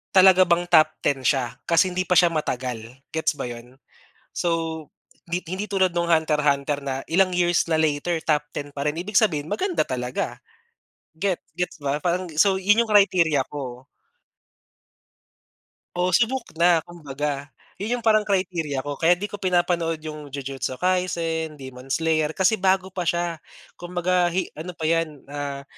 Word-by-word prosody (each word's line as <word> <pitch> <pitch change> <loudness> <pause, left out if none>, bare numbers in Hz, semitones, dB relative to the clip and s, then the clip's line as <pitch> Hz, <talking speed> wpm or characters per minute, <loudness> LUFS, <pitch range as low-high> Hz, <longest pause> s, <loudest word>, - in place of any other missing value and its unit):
talaga 185 0 +8
bang 175 0 +2
top 160 -3 +6
10 135 -2 +1
siya 125 -4 +1
kasi 170 +2 +4
hindi 185 +1 -1
pa 180 - +2
siya 175 - +5
matagal, 125 -7 -3 0.3
gets 160 0 +1
ba - - -3
'yon? 120 +2 -10 0.6
So, 165 -2 -1 0.4
'di 175 +1 -2
hindi 190 +3 -3
tulad 190 -2 +2
noong 170 0 +1
Hunter 160 -1 +2
hunter 140 0 +1
na 135 -1 -2
ilang 185 +2 +3
years 175 -1 +2
na - - +4
later, 155 +2 0
top 150 -2 +1
10 145 0 -5
pa 140 0 -3
rin. 150 - +1
Ibig 195 +3 -1
sabihin, 155 -8 +2
maganda 360 - 0
talaga, 125 -1 -3 0.8
get 185 +2 -1 0.2
gets 180 -2 -3
ba, 145 0 -1
parang 180 +1 0
so, 195 +2 +4
yun 210 +4 +4
yung 220 - -6
criteria 180 -7 +4
ko. 130 -3 -7 2.1
Oo, 180 +1 +1
subok 245 +1 +1
na, 170 -2 +4
kumbaga. 145 -3 -5 0.3
Yun 225 +5 -1
yung - - -20
parang 215 -1 +5
criteria 175 -8 -1
ko 145 -1 -4
kaya 170 +2 +5
'di 205 +3 -4
ko - - -3
pinapanood 175 -3 +1
yung 150 -1 -7
Jujutsu 135 -2 -4
Kaisen, 165 -4 -1
Demon 130 0 -10
Slayer, 160 -1 +1
kasi 190 +3 +3
bago 190 0 +2
pa 180 -1 -3
siya. 170 -2 -1 0.4
Kumbaga 175 0 +1
hi 185 +2 -1
ano 165 +4 -6
pa 160 - -5
'yan, 165 -4 -1
ah, 140 -1 -5
165 Hz, 165 wpm, -24 LUFS, 145-185 Hz, 2.1 s, talaga